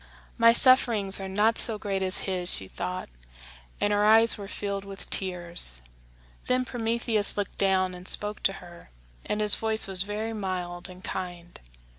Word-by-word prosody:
"My 230 Hz, 0 st, +5 dB
sufferings 235 Hz, -6 st, +4 dB
are 190 Hz, 0 st, -6 dB
not 210 Hz, +4 st, +1 dB
so 225 Hz, -2 st, +1 dB
great 195 Hz, -2 st, -4 dB
as 185 Hz, -1 st, 0 dB
his," 185 Hz, -2 st, -2 dB
she 95 Hz, -, +2 dB
thought; 180 Hz, -, -6 dB, 0.7 s
and 205 Hz, -, 0 dB
her 205 Hz, 0 st, +1 dB
eyes 225 Hz, +2 st, +5 dB
were 200 Hz, -2 st, -9 dB
filled 200 Hz, -1 st, -5 dB
with 195 Hz, -1 st, -6 dB
tears. 175 Hz, -, +3 dB, 0.7 s
Then 255 Hz, 0 st, 0 dB
Prometheus 230 Hz, -3 st, -1 dB
looked 205 Hz, -2 st, -5 dB
down 190 Hz, -1 st, +1 dB
and 180 Hz, +1 st, -11 dB
spoke 210 Hz, 0 st, -2 dB
to -, -, -8 dB
her, 175 Hz, -2 st, -14 dB, 0.4 s
and 210 Hz, -, -2 dB
his 210 Hz, -1 st, +6 dB
voice 220 Hz, -1 st, +3 dB
was 190 Hz, -2 st, -4 dB
very 210 Hz, +3 st, -5 dB
mild 185 Hz, -3 st, -5 dB
and 185 Hz, +1 st, -14 dB
kind. 175 Hz, -2 st, -7 dB
200 Hz, 165 wpm, -25 LUFS, 185-220 Hz, 0.7 s, his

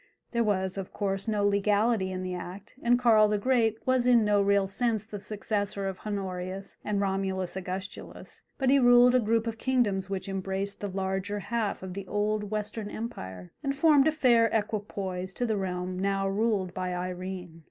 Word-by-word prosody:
There 235 Hz, -1 st, +1 dB
was, 190 Hz, -2 st, 0 dB
of 190 Hz, -, -6 dB
course, 195 Hz, 0 st, -2 dB
no 210 Hz, -2 st, +1 dB
legality 205 Hz, 0 st, +2 dB
in 185 Hz, 0 st, -4 dB
the 185 Hz, 0 st, -3 dB
act, 180 Hz, +3 st, -8 dB
and 245 Hz, +1 st, +4 dB
Karl 225 Hz, -4 st, +5 dB
the 210 Hz, 0 st, +1 dB
Great 225 Hz, -1 st, +2 dB
was 255 Hz, -1 st, +2 dB
in 235 Hz, -3 st, +5 dB
no 205 Hz, -1 st, +3 dB
real 200 Hz, -1 st, +3 dB
sense 220 Hz, +1 st, -1 dB
the 210 Hz, -2 st, -7 dB
successor 205 Hz, -1 st, -2 dB
of 190 Hz, -1 st, -5 dB
Honorius 190 Hz, -1 st, -5 dB
and 210 Hz, -1 st, -1 dB
Romulus 190 Hz, -2 st, -1 dB
Augustulus, 190 Hz, +1 st, -7 dB, 0.2 s
but 265 Hz, -1 st, +2 dB
he 280 Hz, -, +6 dB
ruled 245 Hz, 0 st, +7 dB
a 255 Hz, -, +5 dB
group 225 Hz, 0 st, +1 dB
of 225 Hz, -1 st, -4 dB
kingdoms 205 Hz, -8 st, +1 dB
which 195 Hz, -1 st, -3 dB
embraced 195 Hz, +1 st, -3 dB
the 205 Hz, -, -3 dB
larger 190 Hz, +1 st, -2 dB
half 220 Hz, -2 st, -2 dB
of 185 Hz, -1 st, -6 dB
the 195 Hz, 0 st, -6 dB
old 210 Hz, 0 st, -1 dB
Western 210 Hz, 0 st, -3 dB
Empire, 95 Hz, -, -7 dB
and 275 Hz, 0 st, -1 dB
formed 295 Hz, -1 st, +5 dB
a -, -, +4 dB
fair 240 Hz, -7 st, +4 dB
equipoise 200 Hz, -4 st, -3 dB
to 245 Hz, -, -1 dB
the 220 Hz, -2 st, 0 dB
realm 185 Hz, -1 st, -3 dB
now 195 Hz, 0 st, 0 dB
ruled 200 Hz, -2 st, 0 dB
by 185 Hz, -1 st, -3 dB
Irene. 180 Hz, -1 st, -5 dB
200 Hz, 185 wpm, -28 LUFS, 190-225 Hz, 0.2 s, ruled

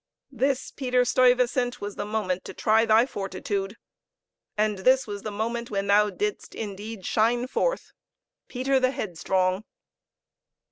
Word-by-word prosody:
This, 270 Hz, 0 st, -1 dB
Peter 250 Hz, -2 st, +1 dB
Stuyvesant, 250 Hz, 0 st, +2 dB
was 205 Hz, 0 st, -6 dB
the -, -, -4 dB
moment 205 Hz, -4 st, -2 dB
to -, -, -8 dB
try 225 Hz, +1 st, +3 dB
thy 220 Hz, +2 st, +5 dB
fortitude; 195 Hz, -1 st, -4 dB, 0.8 s
and 210 Hz, -2 st, +1 dB
this 260 Hz, +6 st, +4 dB
was 205 Hz, -1 st, -6 dB
the 215 Hz, -, -4 dB
moment 235 Hz, +3 st, -3 dB
when 195 Hz, -1 st, -2 dB
thou 205 Hz, +1 st, +4 dB
didst 415 Hz, -, -4 dB
indeed 205 Hz, -1 st, -6 dB
shine 235 Hz, +3 st, +2 dB
forth -, -, -1 dB, 0.6 s
Peter 265 Hz, +1 st, +1 dB
the 255 Hz, 0 st, +3 dB
Headstrong! 185 Hz, -3 st, -1 dB
220 Hz, 135 wpm, -26 LUFS, 200-250 Hz, 0.8 s, thy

